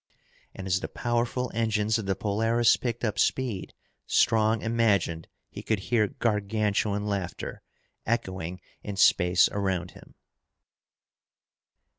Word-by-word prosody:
And 95 - -7
as 95 -1 +1
the - - -4
powerful 120 +1 -1
engines 110 -1 +1
of 105 - -5
the 95 - +1
Polaris 115 +4 +2
picked 120 -1 -4
up 105 -1 -2
speed, 120 -8 -1 0.3
Strong 110 0 +3
imagined 105 -8 +1 0.2
he - - -7
could 110 - 0
hear 105 +2 +1
Gargantuan 105 -1 0
laughter 100 -4 -4 0.4
echoing 95 -6 -3 0.2
in 105 - -6
space 90 -2 +5
around 95 -3 -2
him. - - -17
105 Hz, 115 wpm, -27 LUFS, 95-115 Hz, 0.4 s, space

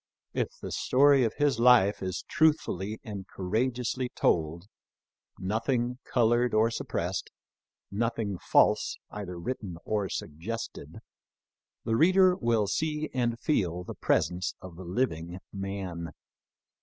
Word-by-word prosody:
If - - 0
the - - -6
story 140 0 +4
of 110 - -2
his 145 -5 +1
life 120 -4 +5
is 95 -1 -3
truthfully 110 - +1
and 100 -3 -7
courageously 125 +6 -1
told 80 +2 +1 0.4
— - - -65 0.2
nothing 120 +5 -1
colored 120 0 +2
or 110 +2 +4
suppressed; - - -3 0.6
nothing 110 -2 -1
false - - +3
either 95 -4 -6
written 95 -2 -5
or 105 -3 -1
suggested 105 +13 -6 0.4
— - - -65
the 115 - +1
reader 185 +6 +5
will 115 - +1
see 155 +8 -1
and 120 -2 0
feel 90 - 0
the - - -7
presence 90 +1 0
of 95 -3 -10
the 95 +2 -9
living 90 -4 -2
man. 95 -4 -4
110 Hz, 125 wpm, -29 LUFS, 95-125 Hz, 0.6 s, life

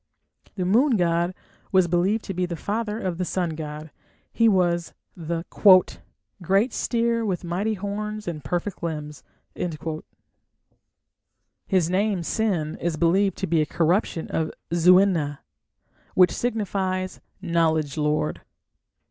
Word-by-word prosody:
The 185 - -2
moon 235 +6 +3
god 175 0 +1 0.4
was 185 -2 +4
believed 185 +6 +1
to 195 - -4
be 180 0 -1
the 175 - -4
father 210 +5 -3
of 185 -5 -3
the - - +1
sun 175 -1 -1
god: 155 -1 -7 0.4
he 230 -1 +4
was 175 -4 +1 0.2
the 165 -1 -4 1.0
"great 195 +7 +1
steer 230 -1 0
with 190 -5 -2
mighty 190 +6 -1
horns 210 +1 -4
and 155 -4 -4
perfect 175 +6 -3
limbs". 150 -4 -5 2.4
His 185 -5 +2
name 190 0 0
Sin 175 -6 -1
is 170 -2 -1
believed 190 +5 +2
to - - -2
be 165 -3 +2
a - - +1
corruption 170 0 0
of 160 -1 -1 0.2
"Zu 175 +2 +6
ena", 165 -7 +1 0.7
which 180 -2 +6
signifies 195 -5 -2 0.2
"knowledge 160 -5 +1
lord". 150 0 -1
180 Hz, 125 wpm, -24 LUFS, 165-200 Hz, 2.4 s, Zu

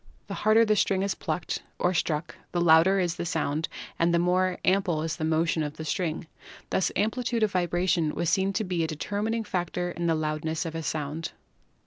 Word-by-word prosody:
The - - -6
harder 220 +2 +4
the 215 -1 +3
string 195 -1 +2
is 200 -1 0
plucked 175 - -3 0.2
or 180 - +1
struck, 160 -1 -1 0.2
the 175 - +1
louder 170 +3 +5
is 175 -2 0
the - - -2
sound 155 -1 -1 0.3
and 170 +1 +3
the 170 - +3
more 180 +1 +2
ample 185 -5 +2
is 165 0 -2
the 160 - -5
motion 160 +1 +1
of 150 0 -4
the 160 - -6
string. 165 -1 -2 0.5
Thus 190 - +1
amplitude 230 +3 0
of 210 - +2
vibration 175 -2 +1
was 170 - -1
seen 190 +3 +2
to 215 - 0
be 180 -4 -1
a - - 0
determining 205 +8 -2
factor 175 -2 -2
in 170 0 -2
the 165 - +3
loudness 155 +1 -2
of 165 - -4
a 165 - -3
sound. 155 +1 -3
175 Hz, 200 wpm, -27 LUFS, 160-190 Hz, 0.5 s, louder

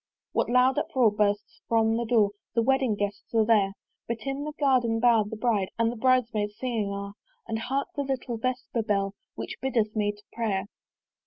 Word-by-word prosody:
What - - 0
loud 250 +1 +4
uproar 245 -5 +2
bursts 210 +2 -1
from 225 -1 +3
that 235 -1 -2
door! 215 -4 +4 0.2
The 230 - +3
Wedding 265 -3 +2
guests 205 +2 -4
are 220 -1 +4
there; 205 -3 +3 0.3
But 230 -1 -3
in 275 +1 -3
the 300 - -3
Garden 250 -5 +3
bower 230 -2 +4
the 220 - -5
Bride 215 -4 +1
And 230 0 0
Bride 255 0 +4
maids 210 -1 -2
singing 230 -5 -1
are: 200 0 -5 0.3
And 220 - -2
hark 270 +4 -1
the 285 - -1
little 260 -3 -3
Vesper 250 0 -2
bell 200 -2 0 0.2
Which - - -6
biddeth 230 -5 0
me 205 -1 +1
to 205 0 -19
prayer. 215 -5 -1
225 Hz, 185 wpm, -27 LUFS, 210-250 Hz, 0.3 s, loud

